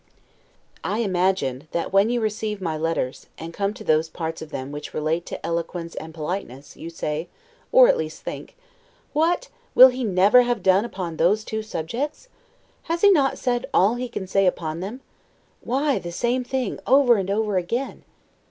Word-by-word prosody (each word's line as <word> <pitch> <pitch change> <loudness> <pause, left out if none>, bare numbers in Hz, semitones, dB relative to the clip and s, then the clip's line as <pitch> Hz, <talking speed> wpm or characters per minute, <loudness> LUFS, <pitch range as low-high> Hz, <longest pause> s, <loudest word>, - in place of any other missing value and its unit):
I 210 - -1
imagine, 185 - 0
that 170 - -2
when 195 +3 +5
you 240 0 0
receive 215 -1 -2
my 165 -4 -2
letters, 155 -5 -2
and 165 +1 -8
come 200 +2 -1
to - - -9
those 155 +1 +2
parts 165 -1 -5
of 160 - -8
them 135 -2 -5
which 145 0 -7
relate 155 +3 -1
to - - -6
eloquence 170 0 -3
and 160 - -7
politeness, 150 -4 -6
you 165 - -8
say, 160 0 -4 0.4
or - - +8
at - - +3
least - - -5
think, - - -7 0.6
What, 340 +10 +1 0.3
will 260 +1 +10
he 255 0 -4
never 200 +3 +5
have 240 -5 -1
done 190 +3 +4
upon 180 -8 -5
those 205 +6 +3
two 220 0 -3
subjects? 235 - -4 0.6
Has 335 +1 -2
he 410 - +7
not 280 -7 +3
said 245 +1 -1
all 200 +5 +5
he 245 0 -4
can 200 -5 -5
say 195 +1 +2
upon 160 -2 -2
them? 210 +9 -6 0.6
Why 275 +2 +1
the 175 - -7
same 245 +7 0
thing 260 0 -3
over 260 -3 +5
and 195 -1 -2
over 210 -1 0
again? 235 +10 -3
195 Hz, 180 wpm, -23 LUFS, 165-245 Hz, 0.6 s, will